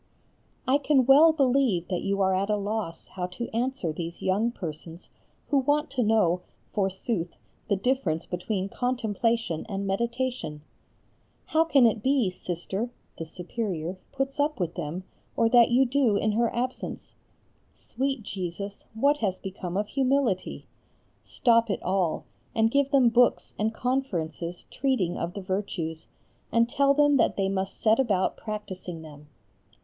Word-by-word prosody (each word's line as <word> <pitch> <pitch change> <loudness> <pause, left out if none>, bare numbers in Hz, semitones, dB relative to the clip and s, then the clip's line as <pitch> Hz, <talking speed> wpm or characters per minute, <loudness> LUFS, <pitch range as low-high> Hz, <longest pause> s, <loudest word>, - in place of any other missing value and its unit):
I 270 +3 +4
can 275 -3 +3
well 290 +5 +8
believe 260 - +2
that 180 -2 -1
you 200 0 0
are 190 0 +3
at 195 +2 0
a 210 - +3
loss 205 -5 -3
how 180 -1 -4
to 235 - -3
answer 245 -9 -1
these 170 +1 -6
young 205 +5 +1
persons 165 -3 -8 0.4
who 285 - +4
want 290 +2 +1
to 260 -2 0
know, 210 -6 +3 0.3
forsooth, 190 -2 -1 0.3
the 200 - +2
difference 195 -8 0
between 185 +2 -2
contemplation 230 -5 -1
and 200 -1 -3
meditation. 235 - -2 0.8
How 320 +1 +3
can 280 -6 +5
it 225 -1 +2
be, 260 -6 +2
Sister 185 +5 -4 0.3
(The 165 - -5
Superior) 180 -1 -4
puts 270 +2 -3
up 295 -2 +1
with 175 -2 -1
them, 165 +5 -4 0.3
or 230 - +4
that 240 -1 +6
you 255 +2 +4
do 250 -5 +2
in 215 - +1
her 230 +2 +2
absence? 250 +2 -4 0.6
Sweet 265 0 -3
Jesus, 200 0 -5
what 280 +6 +3
has 190 -4 0
become 185 -2 -5
of 210 +1 0
humility? 265 -8 0 0.6
Stop 230 -2 +2
it 200 - -2
all, 185 -3 0 0.3
and 225 0 +3
give 280 0 +2
them 270 -4 +5
books 245 +1 +3
and 215 +1 +1
conferences 180 - -2
treating 250 -10 0
of 170 +1 -3
the 200 - -4
virtues, 185 -4 -3 0.4
and 230 0 +4
tell 280 +3 +3
them 290 -1 +5
that 230 - +2
they 195 -1 +1
must 195 0 -3
set 220 +2 +3
about 200 -8 +1
practising 185 -6 -6
them. 150 -1 -12
215 Hz, 150 wpm, -27 LUFS, 185-255 Hz, 0.8 s, well